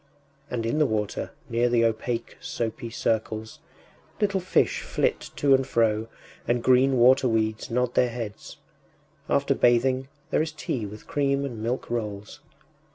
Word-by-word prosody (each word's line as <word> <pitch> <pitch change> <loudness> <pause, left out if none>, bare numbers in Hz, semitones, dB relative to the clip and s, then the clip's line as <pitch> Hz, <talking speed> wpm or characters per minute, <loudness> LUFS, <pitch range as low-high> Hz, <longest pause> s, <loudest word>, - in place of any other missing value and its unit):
And 115 -2 -2
in 115 +7 0
the 150 - +4
water, 105 -3 -2 0.2
near 120 +1 +1
the 120 -1 +3
opaque 115 +1 -2
soapy 115 +1 -4
circles, 110 -1 -2 0.6
little 200 -2 +1
fish 185 - +1
flit - - -1
to 140 -1 +3
and 135 0 +3
fro 110 -3 +1 0.4
and 120 0 +1
green 130 +1 +4
water 130 +2 +5
weeds 110 0 0
nod 125 +1 0
their 125 - +3
heads. 115 -3 -7 0.7
After - - +2
bathing 130 +2 +2 0.2
there - - +3
is 155 -1 -3
tea 120 -7 -3
with 105 +2 -11
cream 140 -1 0
and 120 -5 -6
milk 120 +3 -2
rolls.... 105 -3 -4
120 Hz, 150 wpm, -26 LUFS, 110-130 Hz, 0.7 s, water